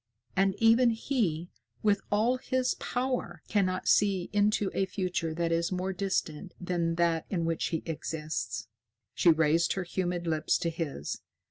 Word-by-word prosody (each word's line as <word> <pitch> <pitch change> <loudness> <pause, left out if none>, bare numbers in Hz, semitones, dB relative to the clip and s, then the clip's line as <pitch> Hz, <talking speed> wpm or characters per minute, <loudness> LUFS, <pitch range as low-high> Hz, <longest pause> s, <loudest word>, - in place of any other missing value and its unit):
And 195 0 +3
even 230 +2 +5
he, 220 - -1 0.3
with 205 -2 +3
all 225 +5 +3
his 255 0 0
power, 245 -10 -2
cannot 185 -3 0
see 195 -3 +3
into 205 -1 +2
a 195 - +1
future 180 -4 -2
that 170 0 0
is 170 +2 +1
more 185 +1 -1
distant 185 -2 -2
than 175 -2 -1
that 170 -1 +1
in 170 -4 -1
which 165 -1 0
he 165 - -2
exists." 150 -7 -4 0.5
She 175 - +4
raised 160 +1 +4
her 190 - -2
humid 175 -1 -2
lips 155 -1 +1
to 170 - -1
his. 155 - -4
180 Hz, 150 wpm, -29 LUFS, 165-205 Hz, 0.5 s, even